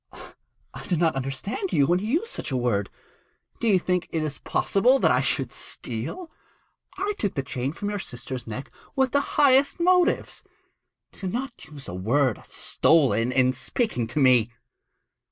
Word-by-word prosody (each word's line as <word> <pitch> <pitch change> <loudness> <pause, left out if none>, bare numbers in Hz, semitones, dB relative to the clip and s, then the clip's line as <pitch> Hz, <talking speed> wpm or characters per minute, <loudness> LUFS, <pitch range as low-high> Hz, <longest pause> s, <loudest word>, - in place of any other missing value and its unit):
I - - -9
do 175 - +1
not 165 -2 +2
understand 135 - -3
you 140 - +4
when 175 +5 +2
you 210 - -4
use 345 - 0
such - - -5
a 130 - -1
word. 105 -5 0 0.7
Do 235 - -1
you 200 -4 +5
think 180 -1 -1
it 155 -3 -3
possible 245 +7 +3
that - - +3
I - - +3
should - - +1
steal? 360 -3 -5 0.7
I 405 +2 -1
took 205 - -1
the 135 - -1
chain 130 0 -3
from 205 +6 -4
your 205 - -3
sister's 125 -5 -7
neck 120 +5 -6 0.2
with 265 -2 +2
the 285 - +3 0.2
highest 280 0 +4
motives. 360 +1 +2 0.7
Do 190 - -6
not 245 +6 -5
use 145 -3 -11
such 90 - -6
a 90 - -5
word 125 +4 +1
as - - -17
"stolen" 125 -7 +2
in 130 0 +3
speaking 130 - -1
to 120 +6 -2
me.' 125 -4 +5
160 Hz, 170 wpm, -25 LUFS, -, 0.7 s, you